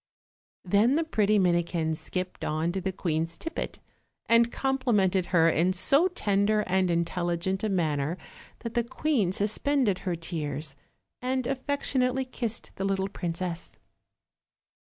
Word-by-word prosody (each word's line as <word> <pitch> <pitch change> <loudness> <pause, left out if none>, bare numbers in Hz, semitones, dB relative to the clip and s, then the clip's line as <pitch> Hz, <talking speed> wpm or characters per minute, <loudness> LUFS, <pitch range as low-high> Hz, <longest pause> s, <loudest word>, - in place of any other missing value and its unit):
Then 205 +8 +4
the 325 - +2
pretty 215 -9 +2
Minikin 170 -3 +1
skipped 180 +3 -5
on 155 +2 0
to 190 +1 -3
the 190 +1 -1
queen's 165 -2 -2
tippet, 330 0 -5 0.5
and 230 0 +4
complimented 215 -9 +1
her 165 -3 +4
in 170 +3 +3
so 275 - +4
tender 210 - +1
and 185 0 +1
intelligent 175 +2 -1
a 215 - +1
manner 160 -3 0 0.4
that 230 -1 -5
the 235 - +2
queen 240 - 0
suspended 215 +1 +1
her 180 -2 -2
tears, 155 -4 -4 0.5
and 255 0 -1
affec 275 +2 -2
tionately 255 0 0
kissed 230 -2 -3
the 190 - -2
little 195 0 0
princess. 175 -1 -4
190 Hz, 130 wpm, -28 LUFS, 170-235 Hz, 0.5 s, Then